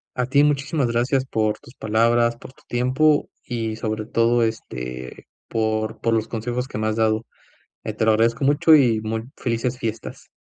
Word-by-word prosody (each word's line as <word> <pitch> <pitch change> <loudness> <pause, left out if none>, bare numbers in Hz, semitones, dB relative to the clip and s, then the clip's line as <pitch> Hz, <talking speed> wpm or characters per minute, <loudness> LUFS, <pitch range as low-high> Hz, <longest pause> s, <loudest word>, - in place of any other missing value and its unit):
A 125 - 0
ti. 140 +2 +4
Muchísimas 145 0 +1
gracias 125 +3 +1
por 110 -4 0
tus 120 - -16
palabras, 115 +2 +2
por 130 - -12
tu - - -24
tiempo 130 +5 +2
y 115 -3 -3
sobre 110 -1 -3
todo, 115 +1 +2
este, 65 - -5 0.2
por 110 -1 -1
por 115 - +1
los 110 0 0
consejos 120 +3 -3
que 135 - -6
me 110 - -1
has 110 - 0
dado, 110 0 +1 0.6
eh, - - -3
te - - 0
lo 110 - +5
agradezco 115 +4 +2
mucho 150 +3 +5
y 120 -6 +3
muy 110 +1 -3
felices 120 +1 -2
fiestas. 110 -2 -6
115 Hz, 180 wpm, -22 LUFS, 110-125 Hz, 0.6 s, lo